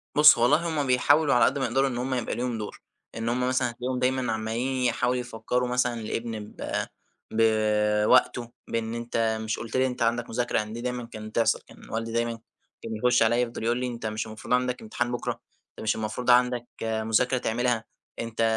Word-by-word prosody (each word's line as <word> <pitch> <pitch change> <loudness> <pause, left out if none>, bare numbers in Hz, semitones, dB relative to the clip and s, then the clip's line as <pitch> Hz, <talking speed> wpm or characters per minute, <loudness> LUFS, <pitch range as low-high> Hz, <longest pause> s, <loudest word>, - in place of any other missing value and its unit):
بُصّ 150 +1 +8
والله، 120 +4 +5
همّ 150 -4 -1
بيحاولوا 145 +4 +4
على 125 - +5
قدّ 140 +2 +1
ما 135 - +1
يقدروا 135 +3 +2
إن 120 - -4
همّ 130 +2 -2
يبقى 125 -3 -2
ليهم 120 -1 -2
دور، 105 -1 -7 0.3
إن 115 0 -2
همّ 125 +1 0
مثلًا 130 -1 +1
هتلاقيهم 125 +2 -3
دايمًا 130 -2 +1
عمّالين 120 +4 -2
يحاولوا 125 +1 +1
يفكروا 125 +1 -2
مثلًا 125 0 +1
الابن 115 +1 -3
ب 105 0 -11 0.7
بوقته، 110 +1 +3 0.2
بإن 115 0 -2
أنت 115 -1 -1
مش 110 +1 -2
قلت 115 +1 -4
لي 130 0 +3
أنت 125 -1 -5
عندك 115 +1 +1
مذاكرة؟ 120 +1 0
يعني 105 0 -2
دي 120 - -5
دايمًا 125 -1 -3
كانت 110 -2 -9
تحصل، 115 - +2
كان - - -15
والدي 115 +1 -3
دايمًا 115 0 -1 0.4
كان 115 -1 -4
يخش 125 +2 +3
عليَّ 120 +2 +3
يفضل 120 -2 -3
يقول 120 +1 +1
لي: 125 - -1
أنت 120 -2 -6
مش 110 +1 -2
المفروض 110 +3 -4
عندك 125 0 +1
امتحان 120 +2 -2
بكرة؟ 120 - -2 0.4
أنت - - -18
مش 110 - +1
المفروض 110 +3 -3
عندك 125 -1 +4 0.2
مذاكرة 110 +3 +1
تعملها؟ 120 -1 0 0.4
أنت 115 -1 -3
120 Hz, 195 wpm, -26 LUFS, 110-125 Hz, 0.7 s, بُصّ